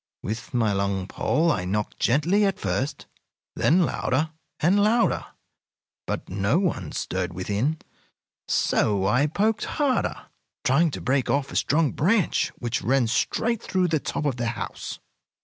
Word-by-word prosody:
With 110 +4 -5
my 115 -5 +1
long 100 -1 -1
pole 160 +10 +1
I 90 - -1
knocked 105 +2 -2
gently 165 - +3
at 195 -2 +1
first, 140 +2 -2 0.5
then 175 +3 +4
louder 155 +4 -1 0.3
and 190 +6 +3
louder, 230 +3 +2 0.8
but - - -3
no 100 - +1
one 155 - -1
stirred 90 -1 -3
within. 105 - -1 0.7
So 100 -2 +1
I 120 +9 +3
poked 215 +8 0
harder, 280 -5 0 0.4
trying 155 +6 +3
to - - -6
break 130 0 +1
off 140 -1 0
a - - -8
strong 150 0 +2
branch 195 +3 +2
which 120 -2 -2
ran 130 +1 +2
straight 220 - 0
through 185 -1 0
the 160 -1 +1
top 150 - -3
of 135 -4 0
the 120 -1 -1
house. 115 0 -5
135 Hz, 150 wpm, -25 LUFS, 105-170 Hz, 0.8 s, then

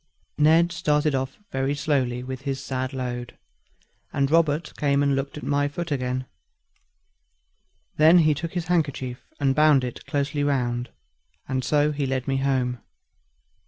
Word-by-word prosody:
Ned 165 +3 +5
started 150 -2 +1
off 130 0 -2
very 135 +2 0
slowly 135 -5 0
with 130 0 -6
his 135 -1 -3
sad 130 0 -3
load, 125 -2 -5 0.7
and 140 0 0
Robert 160 -1 +2
came 140 -1 +1
and 140 -1 +2
looked 135 +2 -3
at - - -8
my 145 0 +1
foot 170 +3 -5
again; 130 -1 -1 1.7
then 160 +3 +7
he 155 -3 +5
took 165 +3 -5
his 175 -2 -2
handkerchief 140 -7 -1 0.2
and 135 -2 +2
bound 150 -2 +5
it 125 -1 -5
closely 145 0 -1
round, 125 -4 0 0.6
and 130 -1 -1
so 150 +2 +2
he 145 -2 -2
led 130 0 -2
me 135 -1 +1
home. 130 -2 0
140 Hz, 150 wpm, -24 LUFS, 130-150 Hz, 1.7 s, then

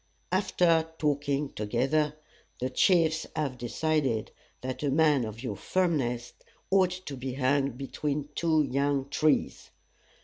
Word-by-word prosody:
After 175 -4 +2
talking 145 -1 0
together, 135 +8 0 0.4
the 130 +1 -2
chiefs 160 +2 +3
have 140 -5 -2
decided 130 -2 0 0.3
that 130 0 -4
a 145 - 0
man 145 -3 +3
of 110 +3 -7
your 125 - -3
firmness 130 -10 -1 0.4
ought 190 -2 +5 0.2
to 140 - -5
be 130 0 -5
hung 140 0 +1
between 140 +2 -3
two 160 -2 +2
young 140 0 0
trees. 150 +1 +1
145 Hz, 125 wpm, -28 LUFS, 130-155 Hz, 0.4 s, ought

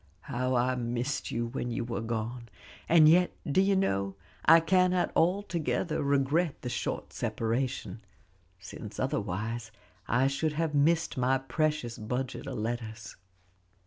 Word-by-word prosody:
"How 125 +3 -1
I 125 +1 +2
missed 120 +2 -2
you 120 0 -1
when 120 +1 -4
you 120 0 -2
were 115 -1 -3
gone! 115 +1 -4 0.4
and 160 -2 +7
yet, 175 +3 +4
do 150 +6 +3
you 195 0 +3
know, 100 - 0 0.3
I 165 +1 +8
cannot 180 +2 +2
altogether 175 -2 0
regret 140 +3 +1
the 125 - -3
short - - -3
separation, 120 0 -2 0.6
since 100 +3 -9
otherwise 110 -3 -2 0.4
I 125 +3 +3
should 140 +3 0
have 160 0 -1
missed 160 +2 +2
my 130 +1 +3
precious 140 -3 -1
budget 125 +5 -4
of 135 -3 -4
letters." 115 0 -4
130 Hz, 135 wpm, -29 LUFS, 115-155 Hz, 0.6 s, I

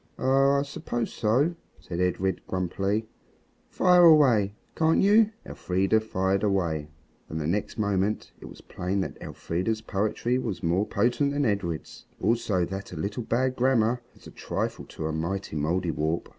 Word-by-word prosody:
"Oh! 135 +1 +3
I 140 - +2
suppose 120 -4 -4
so," 130 +10 +2 0.3
said 85 -1 -6
Edred 90 0 0
grumpily; 95 +4 -1 0.6
"fire 180 -1 +4
away, 125 - +5 0.2
can't 160 0 +3
you?" 210 +2 +5 0.2
Elfrida 95 +4 +1
fired 95 -2 0
away, 85 -7 0 0.4
and 80 - -4
the 75 - -3
next 100 +9 -2
moment 100 0 0
it - - -11
was - - -12
plain 95 +2 -3
that - - -6
Elfrida's 100 +6 -3
poetry 110 +4 -1
was 110 -7 -4
more 90 +5 +1
potent 140 +4 +1
than 145 0 +1
Edred's; 95 -7 -3
also 105 -4 +1
that 95 +2 -6
a 90 - -7
little 105 +7 -3
bad 130 +3 0
grammar 120 -2 +2
is - - -19
a - - -10
trifle - - -4
to 80 - -7
a 80 - -1
mighty 85 +3 -3
Mouldiwarp. 80 0 -1
100 Hz, 155 wpm, -26 LUFS, 90-125 Hz, 0.6 s, away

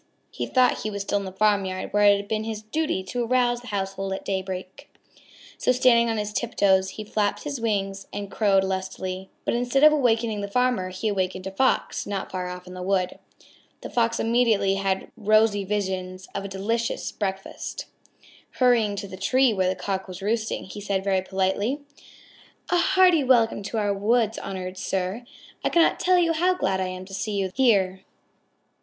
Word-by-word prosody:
He - - -4
thought 255 -1 +3
he 215 - -3
was 200 -1 -4
still 205 - 0
in 200 - -6
the 190 - -6
farmyard 195 -1 0
where 205 0 +4
it 205 0 +7
had 200 0 -6
been 215 0 -1
his 220 -1 -5
duty 220 -3 -1
to 240 +6 -3
arouse 240 0 +1
the 245 - -13
household 195 -1 -3
at 190 - -6
daybreak. 190 +6 -5 0.7
So - - +3
standing 240 -2 +4
on 225 - -1
tip 220 +3 -3
toes 190 -1 +3
he 215 - -4
flapped 205 -1 -1
his 280 -5 -4
wings 195 -3 -2
and 200 -1 -6
crowed 195 -3 +3
lustily. 190 0 -4 0.2
But - - 0
instead 245 +3 +1
of 305 0 +8
awakening 230 -6 +1
the 200 - -3
farmer, 245 -3 +1
he 185 +4 -3
awakened 185 -2 -1
a 190 - -4
Fox 260 +7 0
not 200 -2 -4
far 185 -1 -3
off 180 0 -8
in 180 - -10
the 185 - -7
wood. 185 -1 0 0.6
The - - -8
Fox 230 -1 +1
immediately 225 -4 +2
had 195 -1 -1
rosy 215 -1 +3
visions 190 -2 -3
of - - -3
a - - 0
very 200 0 -6
delicious 225 +4 -2
breakfast. 195 -2 -5 0.7
Hurrying 235 -5 +3
to 200 - -5
the 190 0 -9
tree 255 +5 +3
where 185 -2 +1
the 185 - -1
Cock 190 +1 -3
was 185 -1 -8
roosting, 220 +1 -1
he 195 +2 -9
said 195 -1 -1
very 190 -1 +1
politely: 190 +8 -1 0.9
"A 355 - +4
hearty 360 -3 +4
welcome 235 -5 +3
to 205 +3 -4
our 205 -2 +1
woods, 220 +2 +1
honored 185 -1 -6
sir. 190 +5 -2 0.4
I - - +2
cannot 335 -1 +3
tell 365 0 +3
you 335 -2 +3
how 360 +3 +2
glad 190 - 0
I 185 - -1
am 185 0 -6
to 195 - -12
see 210 +2 -3
you 195 -2 -1
here. 195 -7 +2
205 Hz, 190 wpm, -25 LUFS, 190-235 Hz, 0.9 s, of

